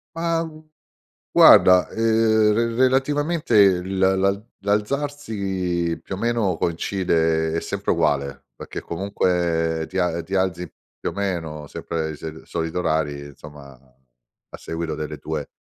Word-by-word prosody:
Ma, 165 0 0
gu 155 -1 -10 0.7
guarda, 90 -1 +7
ehm, 110 -1 +3
re 115 +1 0
relativamente 130 - +3
l 95 +1 -5 0.2
la 100 +2 +1 0.2
l'alzarsi 100 - -1
più 95 - -5
o - - -9
meno 115 -6 0
coincide 80 -2 0
è 80 - -1
sempre 100 +4 -2
uguale, 70 -5 -1
perché - - -8
comunque 85 -3 -1
ti 95 - -6
a 85 -2 0
ti 95 +3 -5
alzi 90 -2 -1 0.3
più - - -3
o - - -12
meno 80 -7 -4
sempre 80 -1 -4
sel 80 0 -8
solito 80 +1 -3
orari 75 -4 -1
insomma, 70 -1 -13
a 65 -1 -19
seguito 80 -2 -4
delle 75 -1 -6
tue 75 -1 -5
90 Hz, 130 wpm, -22 LUFS, 80-105 Hz, 0.7 s, guarda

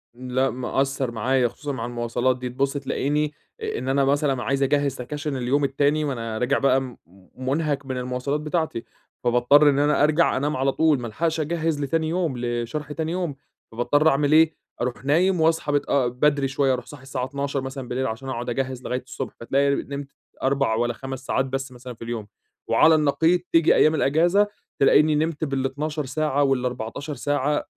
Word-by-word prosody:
لأ 130 +1 0
مأثَّر 135 +1 -1
معايا 125 +3 +1
خصوصًا 145 +5 -6
مع 115 -4 -4
المواصلات 120 +1 -1
دي 125 0 -4
تبص 135 +2 -1
تلاقيني، 145 +2 -1 0.3
إن 130 - -3
أنا 135 0 +2
مثلًا 140 -2 +1
عايز 140 +4 0
أجهِّز 140 0 +2
سكَاشِن 145 +3 -4
اليوم 130 +4 +1
التاني، 145 +3 +1
ما 145 -2 -1
أنا 115 -2 -4
راجع 125 +4 +1
بقى 130 -2 +1 0.4
منهك 140 +2 -1
من 130 -1 -4
المواصلات 125 +3 -2
بتاعتي، 155 -5 -2 0.4
فباضطر 125 +5 +5
إن 140 -1 +2
أنا 145 0 +3
أرجع 155 +1 +3
أنام 145 +2 -1
على 135 +1 +2
طول 155 -1 +2
ما 120 - -5
ألحقش 160 +8 -1
أجهِّز 160 -1 -1
لتاني 160 +3 0
يوم 165 -6 -1
لشرح 120 +5 -3
تاني 160 +1 -3
يوم، 175 -5 -2 0.4
فباضطر 145 +7 +2
أعمل 145 0 +1
إيه؟ 160 0 +5 0.3
أروح 125 +2 -3
نايم 175 +5 +3
وأصحى 160 -2 +2
متأ 140 -2 +1
بدري 140 +3 +1
شوية 135 0 +1
أروح 125 -1 -4
صاحي 130 +1 -12
الساعة 135 -2 -3
00:00 140 +1 -3
مثلًا 135 -1 -6
بالليل، 130 +2 -1
عشان 125 +4 -5
أقعد 120 -1 -4
أجهِّز 130 0 -3
لغاية 125 0 -3
الصبح - - -5
فتلاقي 140 +4 +1
نمت 140 0 -5 0.4
4 135 -3 +2
والّا 120 +1 0
5 130 +2 -7
ساعات 135 - +1
بس 135 0 -4
مثلًا 125 0 -9
في 115 - -11
اليوم، 115 -3 -5 0.4
وعلى 160 0 +5
النقيض 160 +4 +3
تيجي 165 -1 +5
أيام 155 +1 +4
الإجازة 170 +8 +3 0.3
تلاقيني 150 +2 +5
نمت 155 +1 -1
بال12 145 +2 -2
ساعة 145 +1 0
وال14 125 +1 -2
ساعة، 145 +2 0
135 Hz, 175 wpm, -24 LUFS, 125-150 Hz, 0.4 s, فباضطر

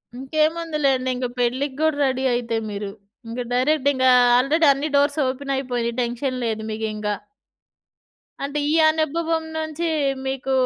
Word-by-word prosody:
ఇంకేముందిలేండి. 300 -1 0
ఇంగ 250 0 -2
పెళ్ళికి 260 +3 0
గూడా 315 -2 +2
రెడీ 260 0 0
అయితే 235 -2 -1
మీరు. 200 -1 -5 0.4
ఇంక 235 +2 -4
డైరెక్ట్ 280 +3 +2
ఇంగా 260 -1 +4 0.3
ఆల్రెడీ 300 +6 +3
అన్ని 285 +3 -3
డోర్స్ 285 +2 +2
ఓపెనైపోయినియి. 255 -3 -2
టెన్షన్ 245 +2 -2
లేదు 220 -1 -2
మీకింక. 215 -1 -3 1.4
అంటే 285 +2 -2
ఈ - - +2 0.2
అనుభవం 320 +1 0
నుంచి 315 +1 -3 0.4
మీకు 265 0 -3
270 Hz, 125 wpm, -22 LUFS, 245-305 Hz, 1.4 s, ఇంగా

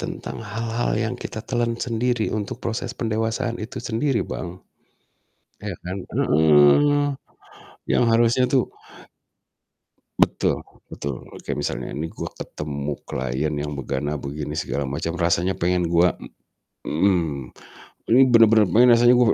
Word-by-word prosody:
Tentang - - -6
hal-hal 115 +1 -1
yang 115 +2 -2
kita 110 - -5
telan 120 -2 0
sendiri 120 -1 0
untuk 105 +1 -4
proses 115 0 -2
pendewasaan 115 +2 -1
itu 115 - -7
sendiri, 120 +3 +1
Bang, - - -4 1.2
ya 100 - -3
kan 90 +2 -4 0.2
heeh. 80 - +5 0.8
Yang - - +3
harusnya 120 +2 +4
tuh 130 -3 +5 1.6
Betul - - +1 0.2
betul, 70 -3 -5
oke, - - -7
misalnya - - -3
ini, 80 +3 -3
gua - - -7
ketemu 75 -1 -5
klien 65 +4 -2
yang 75 0 -3
begana-begini, 70 +2 -4
segala 70 -3 -2
macam, 80 +4 -3
rasanya 85 +2 +2
pengen 90 0 0
gua, 85 +1 +3 0.7
mmm 80 -6 0 0.3
mhm, - - -23
ini 125 - +6
bener-bener 115 -3 +6
pengen 120 +7 +6
rasanya 120 +1 +6
gua 120 -3 +4
95 Hz, 125 wpm, -23 LUFS, 75-115 Hz, 1.6 s, ini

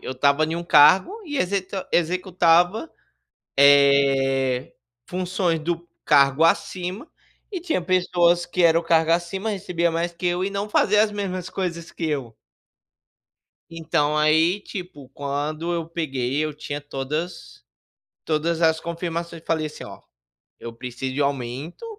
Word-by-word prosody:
eu 130 - -5
estava 140 +4 +2
em 160 +2 -3
um 170 - -5
cargo 185 - +5
e 295 -3 -5
exeta 190 -3 -2
executava, 180 - +2 0.7
eh, 135 -2 +4 0.3
funções 180 -2 -1
do 170 +2 -4 0.2
cargo 140 +2 +4
acima, 185 - 0 0.4
e 370 - -3
tinha 325 - -1
pessoas 175 -1 +2
que 180 0 -1
era 165 0 +5
o - - -8
cargo 165 -1 +2
acima 180 +5 -1
recebia 175 -4 -1
mais 170 +1 -2
que 170 +2 -7
eu 175 +1 0
e 200 - -1
não 200 +1 -4
fazia 210 +1 +3
as 215 - -1
mesmas 185 -3 -4
coisas 170 -3 -4
que 165 - -5
eu. 135 -6 -3 1.4
Então, 155 -2 -1
aí, 160 +5 +3
tipo, 180 -9 -9
quando 145 +5 -3
eu 170 -2 -2
peguei 135 -6 -3
eu 155 - -3
tinha 145 -1 -6
todas 145 +5 -6 0.6
todas 165 +2 -1
as 160 0 +3
confirmações 170 -1 -5
e - - -31
falei 160 -1 -1
assim: 150 - -9
"Ó, - - -11 0.6
eu 115 - -8
preciso 125 +2 -6
de 145 - -2
aumento, 140 - -4
165 Hz, 145 wpm, -23 LUFS, 145-180 Hz, 1.4 s, cargo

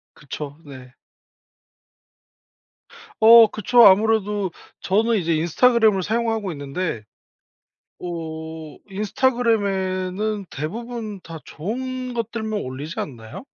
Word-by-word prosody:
그쵸. 145 +1 -8
네. 130 -3 -12 2.3
어 230 0 +9
그쵸. 230 +3 +4
아무래도 205 -1 +3 0.3
저는 225 +4 +1
이제 170 -3 0
인스타그램을 210 +5 +3
사용하고 225 -2 -1
있는데 145 -4 -4 1.0
어 160 -2 -7
인스타그램에는 205 -3 -1
대부분 215 - -6
다 165 -2 -9
좋은 255 +7 -5
것들만 220 -2 -3
올리지 135 +5 -6
않나요? 115 - -7
195 Hz, 220 characters per minute, -22 LUFS, 160-225 Hz, 2.3 s, 어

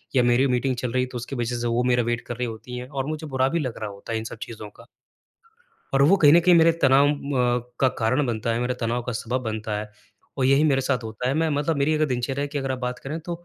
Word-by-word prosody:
या 125 - +5
मेरी 120 +3 +3
मीटिंग 125 +1 0
चल 125 -1 -3
रही 125 0 +1
है, - - -3
तो 125 - -7
उसके 125 +3 -6
वज़ह 120 0 -2
से 120 - -1
वो 120 +1 +1
मेरा 125 -1 +2
वेट 120 0 -1
कर 120 - -5
रही 125 -1 -2
होती 120 +2 -7
हैं 125 +1 -6
और 135 -2 -3
मुझे 155 +1 -5
बुरा 130 -1 +1
भी 170 - 0
लग 130 -6 -4
रहा 105 -1 -4
होता 100 +3 -10
है - - 0
इन - - -6
सब - - -7
चीज़ों 110 -2 -9
का। 115 - -17 1.1
और 135 - +4
वो 180 +8 +6
कहीं 150 -4 +6
न 170 - +7
कहीं 175 +1 +5
मेरे 165 0 +6
तनाव 135 +1 +5
अ, 125 -4 -1
का 130 - +5
कारण 125 +5 +1
बनता 115 0 -1
है, 115 - -1
मेरे 125 +1 -1
तनाव 120 +1 -1
का 125 - -4
सबब 120 +3 -2
बनता 110 -1 -3
है। 105 0 -8 0.5
और 130 - +1
यही 135 +3 +4
मेरे 135 -3 +3
साथ 130 -1 0
होता 110 +3 -4
है 135 - 0
मैं 160 +1 +1
मतलब 145 +2 0
मेरी 145 +3 +2
अगर 155 0 +2
दिनचर्या 130 +2 -2
कि 145 0 -4
अगर 135 -1 -2
आप 130 - -4
बात 125 0 -3
करें 150 +4 -5
तो 170 +1 -7
125 Hz, 285 wpm, -24 LUFS, 120-140 Hz, 1.1 s, न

